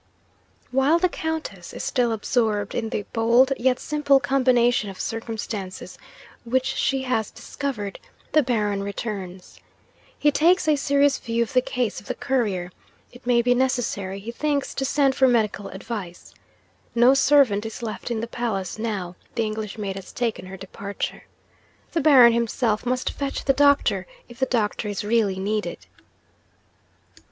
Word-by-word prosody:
'While 270 +5 +3
the 365 +2 +3
Countess 320 -1 -5
is - - -6
still 245 -3 +1
absorbed 215 -2 0
in 225 - -2
the 205 - -3
bold 235 +4 +4
yet 255 +1 +2
simple 285 -2 +2
combination 245 -4 +2
of 190 - -10
circumstances 220 -4 -5 0.5
which 255 +2 0
she 270 0 0
has 225 -5 0
discovered, 230 -9 -5 0.3
the 305 - +5
Baron 210 -6 0
returns. 195 -3 -6 0.6
He 295 - +3
takes 340 +4 +3
a 305 - +5
serious 280 0 +2
view 230 0 0
of 230 - -8
the 255 - +5
case 250 -3 -2
of - - -18
the - - -3
Courier; 205 -9 -1 0.4
it 245 0 -15
may 240 -1 +4
be 245 +1 +4
necessary, 245 -7 -1
he 220 +4 -6
thinks, 285 +2 -1
to 270 - -2
send 275 0 +2
for 265 0 +4
medical 215 -4 +1
advice. 190 -3 -7 0.6
No 240 +3 +6
servant 270 -7 +4
is 225 +2 -7
left 225 +2 -5
in 230 -2 -2
the - - -2
palace, 220 -5 -3
now 200 -6 -3 0.2
the 230 - +1
English 215 -1 -4
maid 200 -3 -3
has 195 - -9
taken 230 -6 -3
her 190 +1 -8
departure. 200 +1 -6 0.7
The 330 - 0
Baron 260 -6 +7
himself 230 -1 0
must 255 +1 0
fetch 280 -1 -4
the 270 - +4
doctor, 270 -10 +3 0.2
if 240 +1 -14
the 265 - +1
doctor 215 -2 -1
is 205 -1 -3
really 210 -3 +1
needed. 210 +2 -2
235 Hz, 155 wpm, -24 LUFS, 205-265 Hz, 0.7 s, Baron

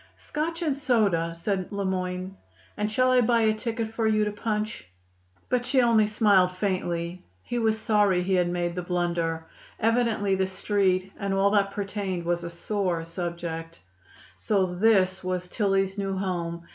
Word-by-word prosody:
"Scotch 330 +3 -3
and 300 -4 +1
soda," 210 - +1
said 185 +2 -2
Le 200 -1 -2
Moyne. 185 0 -3 0.4
"And 210 +1 -2
shall 255 +3 +3
I 255 -1 +5
buy 235 0 +3
a 220 -1 +3
ticket 225 +1 -3
for 225 0 -1
you 215 -1 +3
to 210 - -1
punch?" 215 - -3 0.6
But 250 -1 +1
she 260 +2 +2
only 225 -3 +4
smiled 200 -4 +3
faintly. 180 -2 -2 0.2
He 240 - -2
was 220 -1 +2
sorry 205 -5 +2
he 190 +1 0
had 180 -1 +2
made 175 -1 -1
the 180 - -3
blunder. 170 -2 -1 0.3
Evidently 225 -3 +2
the 190 0 +1
Street 190 -1 0
and 200 -2 -1
all 195 +1 +3
that 200 -1 +3
pertained 195 -3 -3
was 175 0 0
a 170 - -4
sore 175 -1 -2
subject. 165 -1 -5 0.6
So 190 -4 +1
this 190 -1 +3
was 180 0 -2
Tillie's 195 0 0
new 195 -1 -2
home! 170 -3 -3
195 Hz, 165 wpm, -26 LUFS, 180-215 Hz, 0.6 s, I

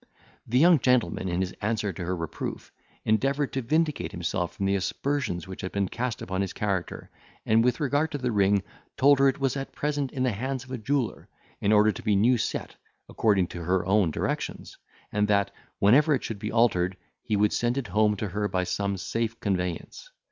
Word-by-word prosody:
The 120 - +1
young 165 +2 +6
gentleman, 125 -7 +1
in 85 +1 0
his 95 -1 -2
answer 105 -2 -1
to 90 - -6
her 90 +2 -1
reproof, 80 -3 -5 0.3
endeavoured 135 +6 +1
to 135 - -1
vindicate 150 - 0
himself 85 +1 -3
from 100 - -2
the 100 - +2
aspersions 100 - -2
which 95 - -7
had 95 - -4
been 100 -1 0
cast 120 -1 -3
upon 95 +1 -2
his 95 - -2
character, 100 -4 -3 0.3
and, 110 +1 +4
with 125 +4 +1
regard 145 +2 +1
to - - -1
the 125 -3 -1
ring, 100 -2 +3 0.3
told 140 0 +5
her 135 - +6
it 135 +1 +1
was 135 -1 0
at 135 -1 -5
present 145 -2 -2
in 130 - -2
the 130 - +2
hands 130 +5 -3
of 130 - -14
a 130 - -2
jeweller, 135 +1 -2 0.3
in 100 - +1
order 105 0 +5
to - - -8
be 105 - +1
new 115 +5 +4
set - - -3 0.3
according 100 -5 +2
to 85 - -7
her 90 +2 +1
own 95 -2 +3
directions, 75 - -3 0.4
and 105 0 +1
that, 100 -2 +2 0.3
whenever 140 +9 +5
it 130 - -4
should 110 -3 -5
be - - -4
altered, 95 -6 +2 0.2
he 110 - -1
would 105 0 +2
send 120 +2 0
it 130 -7 -3
home 105 +2 +3
to 105 0 -3
her 105 +3 -1
by 95 -2 -1
some 100 +1 -2
safe 115 +4 -3
conveyance. 90 - -3
110 Hz, 205 wpm, -27 LUFS, 95-130 Hz, 0.4 s, young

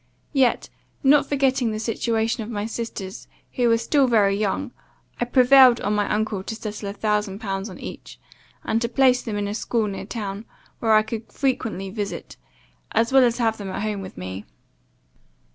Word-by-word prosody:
Yet, 265 -4 +2 0.4
not 280 +1 +5
forgetting 265 -3 +2
the 215 0 -3
situation 225 +1 -1
of 215 - -6
my 210 -2 -3
sisters, 225 -4 -6 0.3
who 245 -2 +2
were 230 - +4
still 275 +3 +2
very 205 -5 +3
young, 215 +6 -1 0.5
I 240 - +1
prevailed 255 -1 +6
on 205 - 0
my 205 -1 0
uncle 210 -2 -1
to 220 - -5
settle 210 -2 -6
a - - -5
thousand 210 -2 -1
pounds 195 -1 -4
on - - -10
each; - - -9 0.4
and 225 +1 0
to 235 - -1
place 255 0 +4
them 215 -3 -4
in 205 0 -1
a 205 - -3
school 225 0 -1
near 200 -2 -5
town, 205 -2 -5 0.3
where 225 -1 +2
I 215 - +5
could 220 0 -6
frequently 220 -8 -2
visit, 205 -1 -5 0.6
as 230 +3 +1
well 265 -1 +7
as 240 -1 +2
have 225 -2 +1
them 200 -2 -5
at 190 - -4
home 210 -2 -2
with 185 - -9
me. 95 +2 -6
220 Hz, 185 wpm, -23 LUFS, 205-240 Hz, 0.6 s, well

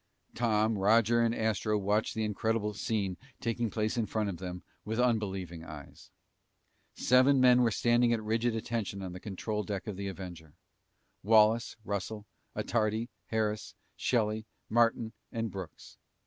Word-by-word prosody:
Tom, 110 -2 +1
Roger, 115 +3 +4
and 115 0 +2
Astro 110 -1 0
watched 105 +2 0
the 110 - 0
incredible 105 0 0
scene 100 -3 -2 0.2
taking 115 0 -1
place 110 +2 -1
in 115 -2 0
front 110 -2 -1
of 90 - -4
them 90 0 -6 0.2
with 110 +3 -3
unbelieving 95 -8 0
eyes. 75 -3 -11 0.9
Seven 130 +2 +5
men 125 -1 +6
were 120 - +4
standing 120 +2 +3
at 115 -2 0
rigid 115 +2 0
attention 110 -4 -3
on 90 -1 -5
the 90 - -7
control 105 +2 -3
deck 100 -1 -4
of 105 -4 -5
the 100 0 -4
Avenger. 85 -5 -8 0.7
Wallace, 110 +2 +4
Russell, 105 +1 -3 0.3
Attardi, 110 +2 0 0.2
Harris, 110 -1 -1 0.2
Shelly, 110 -2 0 0.2
Martin, 115 -1 +2 0.2
and 115 -1 -2
Brooks. 95 -5 -9
110 Hz, 145 wpm, -31 LUFS, 100-115 Hz, 0.9 s, men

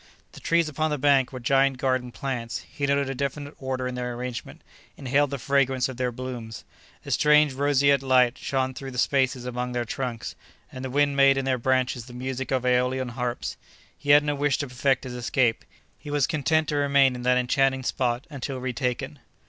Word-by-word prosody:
The - - -12
trees 170 -1 +2
upon 155 +1 -1
the 150 - -1
bank 135 -2 +3
were 130 - -6
giant 135 +2 +2
garden 130 -1 -1
plants; 120 -3 -4
he 140 -1 -2
noted 140 0 +1
a 135 - -2
definite 140 +2 -4
order 130 -1 -3
in 125 - -4
their 125 -1 -4
arrangement, 125 0 -6 0.3
inhaled 140 +2 +1
the 140 - -3
fragrance 135 0 +1
of 130 -2 -8
their 125 -1 -1
blooms. 120 -2 -7 0.4
A - - -6
strange 150 -1 +4
roseate 140 0 +3
light 130 -2 +3
shone 130 -1 -2
through 135 +1 -7
the 125 - -8
spaces 130 -1 +1
among 125 0 -3
their 120 -1 -1
trunks 120 -1 -4 0.4
and 130 - -8
the 130 - -4
wind 145 +1 +2
made 135 0 +5
in 135 - -1
their 130 -1 0
branches 130 -1 0
the 120 - -11
music 130 +1 -4
of 130 -2 0
AEolian 125 +1 +1
harps. 120 0 -4 0.4
He 145 - -9
had 145 0 +7
not 145 -1 -2
wish 145 -2 +2
to 145 - -3
perfect 130 +1 0
his 130 -2 -6
escape—he 125 +3 -2
was 145 -2 +2
content 155 0 +1
to 150 - 0
remain 140 -2 +4
in 125 - -6
that 125 +1 +3
enchanting 130 +1 +1
spot 125 -1 -1
until 135 -1 -5
retaken. 125 -1 -3
130 Hz, 195 wpm, -25 LUFS, 125-140 Hz, 0.4 s, had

